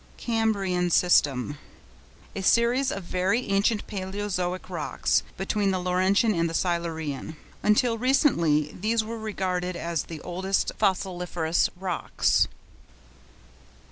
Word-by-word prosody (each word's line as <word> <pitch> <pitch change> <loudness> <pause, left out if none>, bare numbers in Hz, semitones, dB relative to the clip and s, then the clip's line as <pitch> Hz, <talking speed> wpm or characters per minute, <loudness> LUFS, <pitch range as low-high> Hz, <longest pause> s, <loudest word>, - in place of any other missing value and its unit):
CAMBRIAN 200 -6 0
SYSTEM.—A 145 - -1
series 240 +6 +3
of 195 - -4
very 185 +7 0
ancient 200 +2 +2
Palæozoic 190 -2 -3
rocks, 170 -5 0 0.2
between 195 +1 0
the 190 - +1
Laurentian 185 +4 +2
and 170 -2 0
the 165 - -4
Silurian. 160 -4 -2 0.3
Until 230 +2 +2
recently 170 - +2
these 220 +3 +1
were 225 +1 -6
regarded 185 -4 -2
as 170 -1 -2
the 160 -2 -8
oldest 190 +2 -1
fossiliferous 180 -3 0
rocks. 185 -2 +1
185 Hz, 105 wpm, -26 LUFS, 170-210 Hz, 0.3 s, series